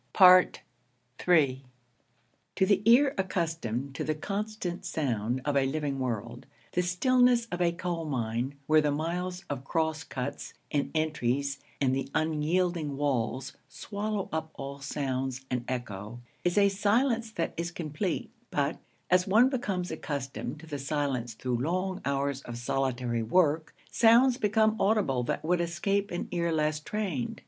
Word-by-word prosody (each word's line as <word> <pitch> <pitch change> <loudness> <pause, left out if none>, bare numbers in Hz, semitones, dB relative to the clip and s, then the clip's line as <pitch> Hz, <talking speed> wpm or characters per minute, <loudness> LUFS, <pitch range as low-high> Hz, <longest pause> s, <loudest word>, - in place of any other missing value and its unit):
III 140 -7 +4 0.9
To 190 - +3
the 200 0 +3
ear 265 +5 +6
accustomed 160 - -2
to - - -3
the 155 - -1
constant 200 +1 -4
sound 125 -4 -1
of 145 -1 0
a 135 -1 +3
living 145 -1 -2
world, 120 0 -4 0.2
the 180 - +1
stillness 245 +7 +3
of 180 0 -2
a 170 -1 +3
coal 170 -1 -3
mine, 125 -1 -2
where 155 +1 +5
the 150 - +1
miles 175 +5 -2
of 140 -2 -4
cross 160 +2 -1
cuts 125 -1 -5 0.2
and 145 -1 0
entries 140 -3 0 0.2
and 130 -2 +2
the 135 0 -3
unyielding 155 0 0
walls 135 -1 -1 0.2
swallow 205 +7 -3
up 160 0 -2
all 140 0 -6
sounds 135 -2 -3
and 125 -1 -1
echo, 115 -3 -5 0.2
is 175 +2 +1
a 200 -1 +6
silence 225 +4 +1
that 170 - -2
is 170 +1 -2
complete; 170 +1 -3 0.2
but, 145 +2 -1 0.3
as 185 +1 +4
one 225 +7 +5
becomes 195 -9 -2
accustomed 140 -1 -4
to - - -11
the 145 -3 -5
silence 135 -5 -2
through 125 +1 -2
long 185 +7 -1
hours 140 0 0
of 120 -3 -7
solitary 120 -1 -1
work, 155 +5 +2 0.2
sounds 240 +2 +5
become 220 0 +3
audible 195 - +2
that 120 - -2
would 175 +1 +2
escape 195 +4 0
an 175 - -3
ear 170 -1 0
less 155 -1 +1
trained. 215 - -3
155 Hz, 145 wpm, -29 LUFS, 135-185 Hz, 0.9 s, ear